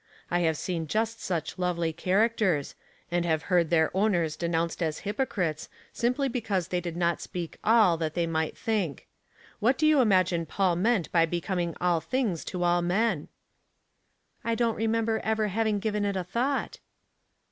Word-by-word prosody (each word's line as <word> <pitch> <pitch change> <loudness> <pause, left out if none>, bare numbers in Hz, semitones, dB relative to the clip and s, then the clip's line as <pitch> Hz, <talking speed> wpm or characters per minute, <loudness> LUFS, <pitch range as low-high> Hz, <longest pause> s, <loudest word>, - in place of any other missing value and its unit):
I 175 - +2
have 160 -3 +1
seen 165 -2 -3
just 225 +5 -1
such 170 0 -3
lovely 170 -2 0
characters, 190 -3 +1 0.4
and 175 0 +1
have 160 -2 0
heard 170 -3 +4
their 160 0 +2
owners 180 -6 +1
denounced 170 0 -1
as 160 -2 -1
hypocrites, 200 - -2 0.2
simply 250 +4 0
because 210 -8 -2
they 180 -1 -1
did 170 -1 -5
not 170 -1 +1
speak 175 -2 -6
all 215 -6 +5
that 160 -1 -3
they 170 -1 +1
might 160 -1 -2
think. 205 -10 -2 0.5
What 250 +5 +2
do 310 - +2
you 305 -3 +5
imagine 185 -6 +2
Paul 185 +1 +1
meant 205 -1 +1
by 165 -1 +4
becoming 175 0 -2
all 175 -2 +2
things 235 -9 -1
to 180 -1 -3
all 175 0 +3
men? 180 -1 0 0.4
" - - -48
" - - -46 0.3
I 230 0 0
don't 230 -1 +1
remember 225 0 0
ever 220 -1 0
having 215 +1 +1
given 210 0 -1
it 200 -1 0
a 185 - -1
thought." 250 +9 -2
180 Hz, 170 wpm, -28 LUFS, 170-220 Hz, 0.5 s, all